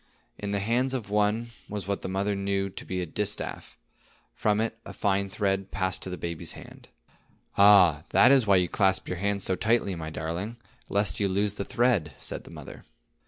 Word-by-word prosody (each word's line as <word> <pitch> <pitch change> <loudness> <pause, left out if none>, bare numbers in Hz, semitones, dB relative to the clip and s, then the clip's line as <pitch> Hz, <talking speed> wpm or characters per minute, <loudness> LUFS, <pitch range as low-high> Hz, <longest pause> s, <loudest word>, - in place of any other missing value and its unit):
In 100 - -4
the 100 - 0
hands 120 +6 +1
of 105 -6 -5
one 105 +3 +1 0.2
was 100 -3 -5
what 100 0 -1
the - - -4
mother 100 +2 0
knew 100 0 -1
to - - -9
be 90 -1 -2
a - - -3
distaff; 105 +5 -4 0.6
from 105 0 +1
it, 110 0 0
a - - -9
fine 100 -1 0
thread 95 -1 -1
passed 95 -1 -2
to - - -6
the 90 - -5
baby's 85 -2 -5
hand. - - -12 0.7
"Ah, 95 -7 +7
that - - +6
is 130 -5 +4
why 100 - +6
you 90 -1 +3
clasp 95 +1 +1
your 90 - -3
hands 100 +1 -1
so 95 - +1
tightly, 110 -1 +1
my 80 -2 -5
darling, 85 +9 -4 0.3
lest 100 -4 +1
you 100 - +2
lose 100 +2 0
the 100 -1 -4
thread," 110 - +1
said - - -6
the - - -12
mother. - - -10
100 Hz, 200 wpm, -27 LUFS, 95-105 Hz, 0.7 s, Ah